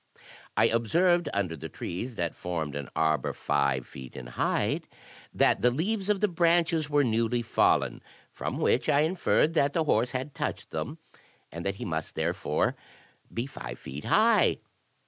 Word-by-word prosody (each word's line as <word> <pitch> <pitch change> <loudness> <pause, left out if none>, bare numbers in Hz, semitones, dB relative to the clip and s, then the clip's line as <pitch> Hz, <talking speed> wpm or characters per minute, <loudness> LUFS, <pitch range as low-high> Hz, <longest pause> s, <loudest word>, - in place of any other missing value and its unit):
I - - +6
observed 170 +9 +2
under 95 -5 -1
the 75 - -7
trees 115 +8 -5
that 85 -4 -2
formed 80 -5 -4
an 70 -2 -5
arbor 80 -3 +1
five 70 -3 0
feet 65 -2 -11
in 65 - -7
height, - - 0 0.5
that - - +3
the 125 - +5
leaves 190 - -1
of 205 -1 +2
the 210 - +4
branches 170 -3 +2
were 145 -1 +3
newly 115 0 +1
fallen; 115 - +2 0.3
from - - -4
whence - - +2
I 140 - +4
inferred 165 -1 +2
that 140 -3 +2
the 165 - +2
horse 125 -5 +2
had 130 +3 -4
touched - - -4
them, - - -4 0.5
and 85 +1 -6
that 100 - -1
he 120 - -6
must 80 -5 -3
there - - 0
fore - - 0 0.6
be 115 - -2
five 65 - -7
feet 70 +3 -8
high. - - +4
120 Hz, 165 wpm, -28 LUFS, -, 0.6 s, I